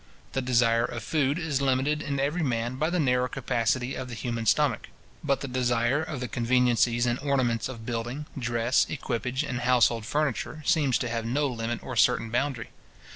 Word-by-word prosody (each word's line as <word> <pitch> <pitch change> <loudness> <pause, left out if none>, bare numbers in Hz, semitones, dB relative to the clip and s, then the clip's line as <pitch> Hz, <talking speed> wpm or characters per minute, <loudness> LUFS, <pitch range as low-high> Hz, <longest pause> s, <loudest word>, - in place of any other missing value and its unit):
The 135 - 0
desire 115 -2 +3
of 115 -3 -6
food 145 +2 +1
is 155 -5 -1
limited 140 +3 +1
in 140 -3 -2
every 145 +6 0
man 120 -3 -1
by 155 +4 +1
the 180 0 0
narrow 125 -3 +2
capacity 120 +2 -1
of 130 - -5
the 120 - -6
human 115 -1 -3
stomach; 130 +1 +2 0.3
but 140 -2 0
the 140 - -4
desire 125 +1 +1
of 155 -4 -5
the 125 - -2
conveniencies 120 0 +2
and 120 0 0
ornaments 130 -5 0
of 115 -3 -8
building, 120 +5 -4
dress, 120 -1 +1
equipage, 125 -2 -2
and 120 - -3
household 120 -2 +2
furniture, 150 +2 -2
seems 140 -6 +3
to 120 - -3
have 115 -1 -2
no 135 +6 0
limit 120 -3 -3
or - - -6
certain 115 - +3
boundary. 125 -1 -2
125 Hz, 180 wpm, -27 LUFS, 120-140 Hz, 0.3 s, desire